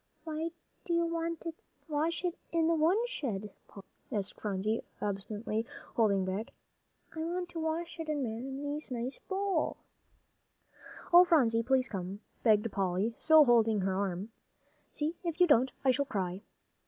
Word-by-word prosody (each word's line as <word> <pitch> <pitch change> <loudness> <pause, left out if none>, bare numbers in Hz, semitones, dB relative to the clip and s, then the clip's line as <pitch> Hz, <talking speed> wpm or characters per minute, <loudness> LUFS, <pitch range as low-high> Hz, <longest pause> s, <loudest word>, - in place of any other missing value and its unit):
"Why 320 0 -3 0.3
do 345 - -2
you 340 0 +3
want 335 0 -2
to 335 -1 -4 0.3
wash 320 +4 -1
it 350 - +1 0.2
in 330 -1 +2
the 335 - +3
woodshed, 315 - 0
Polly?" 200 - -12 0.3
asked 205 -2 -2
Phronsie, 210 +2 -1 0.2
obstinately, 210 +2 -2 0.3
holding 200 -4 +3
back. 195 +4 -2 0.7
"I - - -5
want 350 +2 -2
to 340 - -6
wash 330 +2 -2
it 320 -1 -4
in 295 -2 0
Mamsie's 270 +6 -4
nice 250 +1 -4
bowl." 385 -4 -1 1.4
"Oh, 350 +1 +11
Phronsie, 250 -10 +4
please 255 +1 +2
come," 195 -2 -5 0.2
begged 215 -1 +3
Polly, 195 +3 0
still 315 -1 +7
holding 225 -4 +4
her 190 0 0
arm. 195 +2 -2 0.6
"See, 310 +3 -2
if 335 -1 -3
you 360 - +8
don't, 260 -5 +4
I 260 - +6
shall 280 +2 +1
cry." 190 -6 -2
265 Hz, 150 wpm, -32 LUFS, 210-330 Hz, 1.4 s, Oh